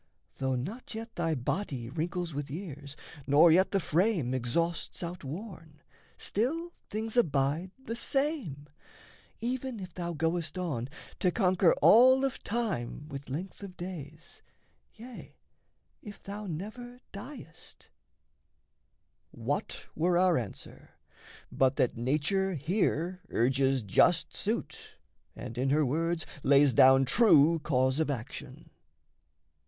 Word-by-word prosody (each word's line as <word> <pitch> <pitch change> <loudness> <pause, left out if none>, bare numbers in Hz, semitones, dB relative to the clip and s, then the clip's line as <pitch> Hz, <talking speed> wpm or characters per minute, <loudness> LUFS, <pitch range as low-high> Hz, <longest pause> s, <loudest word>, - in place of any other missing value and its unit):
Though 130 -1 0
not 205 - -6
yet 225 +1 -7
thy 165 -2 -1
body 130 - -3
Wrinkles 165 +4 -3
with 145 0 -4
years, 145 -3 -7 0.3
nor 155 +4 +6
yet 185 +4 +4
the 195 - +1
frame 170 - +1
exhausts 165 +10 -1
Outworn, 170 -1 -7 0.4
still 325 - -2 0.2
things 220 +2 -3
abide 155 - +1
the 230 - -4
same, 245 - -2 0.7
even 250 0 -3
if 185 -3 -8
Thou 175 -1 -4
goest 165 +1 -1
on 140 -9 -3 0.3
to 180 - +3
conquer 185 -2 +3
all 260 +4 +7
of 270 - -3
time 195 - -3
With 140 -1 -8
length 175 +11 -6
of 195 -2 -9
days, 165 -3 -9 0.5
yea, 245 +2 -11 0.7
if 205 -3 -11
thou 205 +1 -6
never 220 +9 -7
diest" 205 - -11 1.4
What - - -4
were 175 +2 +2
our 180 -1 +4
answer, 115 -6 -6 0.6
but 135 0 +2
that 125 - +1
Nature 155 +10 0
here 175 +2 -1
Urges 130 +1 +1
just 100 - +3
suit - - -4 0.4
and 120 -1 -7
in 135 +1 +1
her 150 +2 +3
words 165 +5 -1 0.2
lays 140 -1 +5
down 130 +3 +6
True 165 - +5
cause 130 -2 +1
of 160 - +1
action? 120 -5 -6
165 Hz, 120 wpm, -30 LUFS, 140-200 Hz, 1.4 s, all